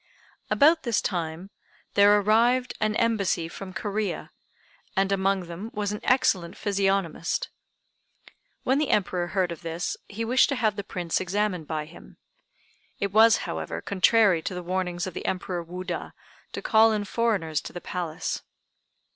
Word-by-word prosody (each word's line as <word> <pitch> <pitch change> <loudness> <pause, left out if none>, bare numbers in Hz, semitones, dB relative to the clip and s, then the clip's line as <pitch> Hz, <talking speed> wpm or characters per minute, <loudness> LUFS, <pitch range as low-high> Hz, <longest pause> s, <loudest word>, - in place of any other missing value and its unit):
About 315 +3 +5
this 235 -4 +1
time 170 +1 -3 0.4
there 205 +1 +6
arrived 235 +5 +3
an 215 0 +1
embassy 200 -8 +1
from 185 +3 -8
Corea, 205 +2 -3 0.7
and 195 0 +2
among 195 0 +1
them 175 +5 -7
was 205 -1 -1
an 210 - -4
excellent 185 -9 +1
physiognomist. 195 -5 0 1.1
When 265 +3 +2
the 300 - 0
Emperor 180 -3 +1
heard 185 -1 0
of 170 - -7
this, 165 +2 -3
he 225 +3 -4
wished 250 +3 +4
to 280 - 0
have 220 -4 +1
the 200 - -4
Prince 175 -3 -2
examined 185 -3 -1
by 155 -1 -3
him. - - -15 0.8
It 200 -1 -1
was, 225 +1 +7
however, 80 -1 -4
contrary 200 -2 +3
to 185 - -4
the 180 - -5
warnings 180 0 -2
of 185 - -6
the - - -5
Emperor 180 -1 -2
Wuda, 180 +2 -5 0.4
to - - -4
call 220 0 +5
in 210 -1 -1
foreigners 200 -10 0
to - - -8
the 175 - -6
Palace. 175 -3 -4
195 Hz, 155 wpm, -26 LUFS, 175-215 Hz, 1.1 s, was